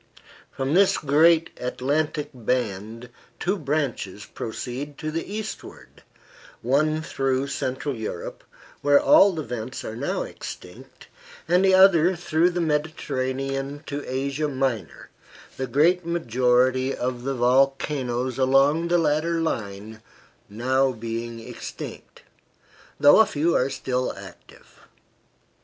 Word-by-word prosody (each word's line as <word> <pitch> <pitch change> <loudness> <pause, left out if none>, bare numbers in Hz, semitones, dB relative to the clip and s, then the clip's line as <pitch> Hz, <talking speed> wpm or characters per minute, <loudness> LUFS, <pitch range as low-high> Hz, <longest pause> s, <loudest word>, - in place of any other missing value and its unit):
From 135 +2 -3
this 195 +2 +4
great 160 +3 +4
Atlantic 145 +4 -2
band 115 -1 -3 0.3
two 190 +3 0
branches 140 - -3
proceed 130 +5 -6
to 155 -1 -4
the 165 +5 -4
eastward, 215 +1 -8 0.6
one 155 +5 +1
through 135 -2 -1
Central 130 +1 -3
Europe, 110 -7 -6 0.4
where 145 0 +5
all 200 - +6
the 160 -2 -4
vents 125 0 -6
are 110 - -5
now 140 - -2
extinct, - - -10 0.4
and 180 +2 +3
the 190 -1 +5
other 185 -2 +6
through 170 0 +1
the 175 0 -3
Mediterranean 135 -2 -2
to 145 0 -5
Asia 140 +3 -1
Minor, 130 - -3 0.5
the 130 - -3
great 165 +8 +3
majority 130 -4 +1
of 125 0 -3
the 135 +1 -2
volcanoes 130 0 +1
along 135 +5 +3
the 175 +1 +3
latter 165 +1 +1
line 110 -7 -4 1.0
being 115 +1 -5
now 115 - -10
extinct, - - -9 0.8
though 145 +6 +7
a 220 - +6
few 160 +3 0
are 130 - +2
still 130 -1 -2
active. - - -14
135 Hz, 115 wpm, -24 LUFS, 125-155 Hz, 1.0 s, though